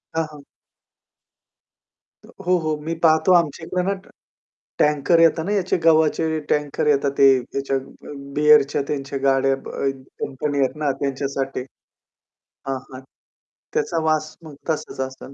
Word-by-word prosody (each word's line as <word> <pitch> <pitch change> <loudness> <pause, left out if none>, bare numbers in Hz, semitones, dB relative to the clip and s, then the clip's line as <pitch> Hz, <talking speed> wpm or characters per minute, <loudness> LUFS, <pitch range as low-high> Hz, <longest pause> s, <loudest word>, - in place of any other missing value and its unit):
हां, 165 0 +1
हां. 145 -2 -13 1.8
हो, - - -16
हो, 180 +1 +3
हो. 155 -2 -1
मी 160 +2 -3
पाहतो 160 +3 +5
आमच्याकडे 170 +1 +1
ना 200 - +2
ट - - -21 0.7
टँकर 150 +3 +3
येतात 165 -1 +4
ना 200 - -2
याचे 190 -3 +1
गव्हाचे 160 0 +3
टँकर 150 0 0
येतात 140 -1 +2
ते 140 - +7
ह्याच्या 135 +2 -3
अ, 135 +2 -10 0.2
बीअरच्या 150 -1 +5
त्यांच्या 140 -1 -3
गाड्या 135 0 +3
ब - - -8
अ, 135 - -1 0.3
कंपनी 145 +1 -2
आहेत 135 +1 +1
ना 145 - +2
त्यांच्यासाठी. 135 -1 -2 1.1
हां, 135 -1 -1
हां. 130 - -8 0.7
त्याचा 430 - 0
वास 155 0 0
मग 155 -3 -11
तसाच 155 -4 -3
असेल. 130 +1 -12
150 Hz, 140 wpm, -22 LUFS, 140-160 Hz, 1.8 s, ते